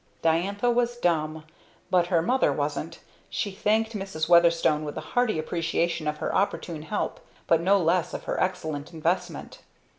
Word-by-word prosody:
Diantha 195 +8 +2
was 240 0 +1
dumb, 160 -6 0 0.5
but 180 -2 +3
her 170 -2 +2
mother 255 +8 +2
wasn't. 150 +3 -3 0.3
She 200 - -2
thanked 220 +3 +1
Mrs. 190 -6 -3
Weatherstone 170 -3 +4
with 150 -1 -6
a 155 - -8
hearty 245 -6 +2
appreciation 165 0 -1
of 150 0 -1
her - - -3
opportune 175 -5 -1
help, 205 +7 -3 0.3
but 165 -1 +3
no 195 +3 +4
less 175 -1 +1
of - - -6
her - - -2
excellent 160 -4 -2
investment. 165 +3 -2
170 Hz, 155 wpm, -26 LUFS, 155-200 Hz, 0.5 s, Weatherstone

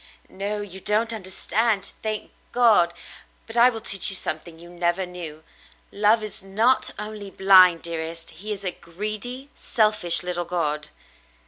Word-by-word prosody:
"No, 205 +2 -4
you 190 -2 -8
don't 220 +4 0
understand, 205 +1 -1
thank 215 -1 -4 0.2
God. 220 -8 +4 0.5
But 225 - -7
I 240 +1 +6
will 225 -3 -6
teach 195 -3 +4
you 195 - +5
something 160 -1 -5
you 170 +1 -13
never 175 +1 -1
knew. 165 -4 -9 0.5
Love 215 +2 +2
is 210 -2 -5
not 215 +7 +1
only 210 -1 -7
blind, 185 -3 +5
dearest; 165 0 -5
he 200 +7 -8
is 200 -1 -5
a 185 - -1
greedy, 215 +11 -6
selfish 215 -7 +3
little 175 -1 -3
god." 150 -4 -2
195 Hz, 145 wpm, -23 LUFS, 175-215 Hz, 0.5 s, I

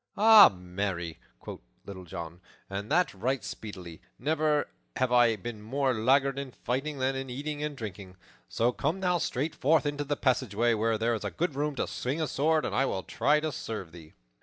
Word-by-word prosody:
"Ay, 215 -1 +9
marry," 90 -2 -4 0.2
quoth - - -8 0.3
Little 95 -2 -9
John, 85 +1 -8 0.3
"and 100 +4 -5
that 180 +3 +2
right 120 +4 -2
speedily. 95 -6 -8 0.2
Never 150 +1 +1 0.3
have 130 -1 0
I 120 -2 +5
been 110 +1 -7
more 130 +4 0
laggard 135 +4 +2
in 135 -3 -6
fighting 135 +4 -3
than 135 0 0
in 135 0 -4
eating 145 +4 -4
and 150 -2 -3
drinking. 100 -4 -8 0.3
So 120 +2 +1
come 155 +9 -2
thou 180 -2 +2
straight 150 +2 -2
forth 155 +1 +2
into 145 0 -1
the 145 0 -2
passageway, 120 -3 +1
where 110 0 +1
there 115 +2 +1
is 110 - -3
good 175 -2 0
room 145 +1 -2
to - - -1
swing 135 +6 -3
a 160 - 0
sword, 155 +3 +1
and - - -3
I 135 - +2
will 95 -7 -2
try 145 +6 +2
to 155 0 -2
serve 110 - -6
thee." 80 -2 -13
130 Hz, 190 wpm, -29 LUFS, 105-145 Hz, 0.3 s, Ay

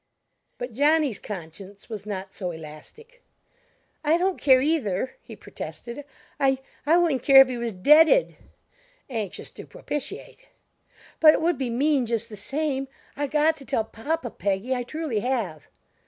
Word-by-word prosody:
But 245 - -5
Johnny's 290 0 +2
conscience 195 +1 -9
was 210 -3 -7
not 190 -2 -5
so 185 -3 -4
elastic. 170 - -12 0.8
"I 310 +2 +3
don't 370 +1 -1
care, 260 -2 +6
either," 260 - -1
he - - -11
protested. 245 +4 -8 0.3
"I 270 -1 +3 0.3
I 325 +3 +5
wouldn't 325 -8 +2
care 275 0 +8
if 265 - +4
he 250 - -3
was 235 -1 -2
deaded" 310 - +5 0.8
anxious 215 -6 -4
to - - -11
propitiate - - -7 0.7
"but 310 -1 +8
it - - -2
would 335 -3 +1
be 260 -3 -1
mean 265 +1 +1
just 230 0 -2
the 215 - -8
same. 275 +5 -2 0.3
I 290 +1 -2
got 305 +2 +2
to 275 - -11
tell 260 -5 0
papa, 245 +4 -4
Peggy, 200 +6 -1
I 250 - -1
truly 270 -2 -3
have." 210 - -3
260 Hz, 155 wpm, -25 LUFS, 215-305 Hz, 0.8 s, care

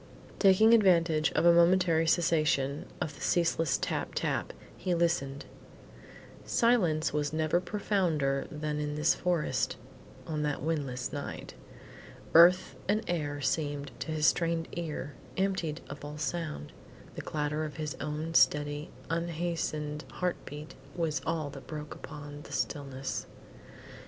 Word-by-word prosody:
Taking 210 +3 +6
advantage 170 -7 +4
of 160 - +2
a 170 - +8
momentary 170 -1 +4
cessation 155 -4 +2
of 155 - -3
the - - -14
ceaseless 165 -4 +2
tap - - -3
tap, - - -1 0.2
he 180 -1 -1
listened. 165 -5 0 1.0
Silence 175 -12 +2
was 150 -1 0
never 155 +2 +1
profounder 175 -9 0
than 150 0 -3
in 150 0 -2
this 150 +2 +3
forest 175 -3 0 0.5
on 155 -2 -2
that 145 -2 -1
windless 140 -6 -2
night. 145 -1 -6 0.8
Earth 175 +3 +7
and 210 +3 +1
air 145 -4 -2
seemed, 145 0 -1
to - - -5
his 155 -1 0
strained 165 -1 +2
ear, 155 -4 -4 0.2
emptied 190 -5 -1
of 140 +1 -9
all 150 +1 -6
sound. 150 - -3 0.4
The - - -6
clatter 150 0 -2
of 150 -2 -5
his 155 -2 -3
own 150 +2 -3
steady, 145 -1 +3 0.2
unhastened 165 -3 -2
heart 180 -1 -1
beat 150 +1 -8 0.2
was 165 -3 -1
all 160 -3 -1
that 135 -1 -11
broke 150 -1 -6
upon 145 -1 -9
the - - -11
stillness. 135 -2 -3
155 Hz, 130 wpm, -30 LUFS, 145-170 Hz, 1.0 s, a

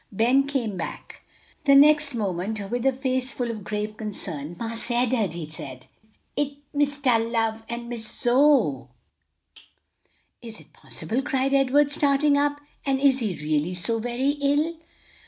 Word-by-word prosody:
Ben 245 +7 +3
came 240 -9 -2
back 165 - -7 0.4
the 275 -1 +6
next 295 -1 +5
moment 200 0 -2
with 245 +2 0
a - - +5
face 260 0 -2
full 245 -2 -2
of 215 -3 -7
grave 210 +1 -4
concern. 175 -7 -5
"Marse 230 +1 -3
Ed'ard," 240 -6 +1
he 165 -3 -6
said, 130 -4 -8 0.5
"it's 285 -1 -1 0.2
Mistah 285 -4 +2
Love 225 -1 -1
and 235 0 -5
Miss 235 -2 -5
Zoe." 240 - +2 1.5
"Is 225 -2 -8
it - - -19
possible!" 240 +5 -3
cried 270 0 0
Edward, 275 +1 +3
starting 290 0 +3
up. 290 0 +1 0.2
"And 270 -1 0
is 270 -1 +4
he 210 -7 -2
really 155 +3 0
so 225 +6 0
very 245 +4 -1
ill?" 295 +4 +1
240 Hz, 145 wpm, -25 LUFS, 215-275 Hz, 1.5 s, the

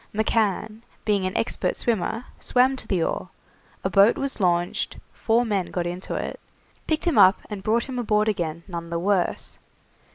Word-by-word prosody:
McCann, 220 0 0 0.2
being 200 -3 +1
an 185 - -3
expert - - -1
swimmer, 225 +1 -1
swam 255 +2 +3
to - - -6
the 180 -4 +1
oar, 185 - -2 0.5
a 190 - 0
boat 200 +5 +5
was 275 -2 -2
launched, 175 -2 0 0.2
four 235 +2 +1
men 200 -5 0
got 175 -1 -2
into 175 +2 -4
it, - - -4 0.5
picked 315 -1 0
him 340 -4 +3
up, 190 +2 +7
and 205 -2 -4
brought 225 +3 +1
him 260 -2 -5
aboard 215 -2 +2
again 170 -5 -2
none 170 -2 -6
the 170 - -2
worse. 185 +1 -1
205 Hz, 170 wpm, -24 LUFS, 180-230 Hz, 0.5 s, up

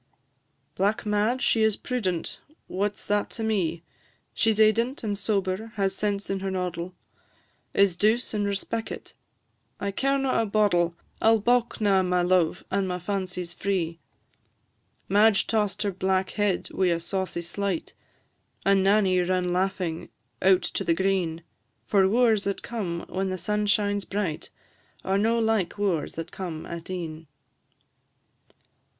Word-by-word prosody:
"Black 205 +4 0
Madge 215 +5 +1
she 225 - +3
is 220 -1 +3
prudent." 190 -10 -2 0.3
"What 205 +2 -2
's - - -7
that 205 0 0
to 225 - -3
me?" 175 -7 0 0.5
"She 225 - +2
is 215 - +2
eident 230 +5 +3
and 205 -2 -1
sober, 200 +1 -2
has 195 -2 +1
sense 205 -1 -1
in 195 0 -2
her 195 0 -3
noddle 180 -1 -3 0.8
Is 200 -3 +4
douce 220 +6 +1
and 205 -1 0
respeckit." 220 +3 -4 0.7
"I 200 - -2
carena 270 +3 +1
a 225 - -1
boddle; 180 -5 +2 0.3
I 220 - +5
'll 225 - +6
baulk 240 +2 +1
na 195 -2 +4
my 180 -1 +1
luve, 180 -1 +2
and 195 0 +1
my 180 -1 -2
fancy 185 0 -3
's 170 0 -8
free." 175 -4 -2 1.1
Madge 205 +1 +4
toss'd 205 -3 -1
back 190 0 +1
her 205 - -1
head 190 -3 -1
wi' 190 - +2
a 170 -1 +2
saucy 185 0 -3
slight, 190 0 -3 0.7
And 195 -1 +4
Nanny 195 -2 +4
run 180 0 +1
laughing 180 -3 -1 0.3
out 190 -1 +5
to - - -2
the 165 - +2
green; 180 -3 0 0.4
For 195 -2 +3
wooers 225 -2 +3
that 200 0 -2
come 185 -8 -4
when 190 0 -2
the 185 - -2
sun 210 +4 -1
shines 205 -1 +1
bright 195 -6 -3 0.6
Are 195 +1 +2
no 225 +3 +2
like 220 -5 +1
the 205 - -7
wooers 180 -6 0
that 165 0 -6
come 170 -4 -5
at 170 0 -7
e'en. 165 -3 -5
195 Hz, 155 wpm, -26 LUFS, 180-210 Hz, 1.1 s, ll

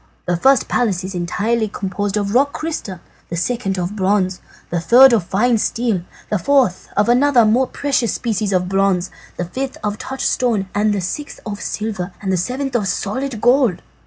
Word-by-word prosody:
The 175 - 0
first 265 +9 +3
palace 200 -7 0
is 190 +1 -5
entirely 205 +6 -1
composed 205 0 -3
of 205 -1 -1
rock 280 +3 +3
crystal, 300 - -5 0.3
the 170 - -4
second 195 +1 -1
of 180 +3 -3
bronze, 190 -2 0 0.3
the 175 - 0
third 245 +10 +7
of 210 -7 +2
fine 225 +5 +2
steel, 225 -4 0 0.3
the 210 - +1
fourth 255 -3 +2
of 205 - +3
another 250 +1 +4
and 215 -1 +4
more 260 +2 +2
precious 270 -6 0
species 215 -3 -2
of 180 -1 +1
bronze, 195 -1 +1 0.3
the 175 - -2
fifth 265 +9 -4
of 210 0 -2
touchstone, 245 -5 -1
the 205 -1 +1
sixth 290 +11 -5
of 205 -2 -5
silver, 200 -4 -4
and 190 -2 -2
the - - +2
seventh 255 +8 -3
of 210 -5 +1
solid 240 +5 -2
gold. 245 -8 +3
210 Hz, 180 wpm, -19 LUFS, 190-245 Hz, 0.3 s, third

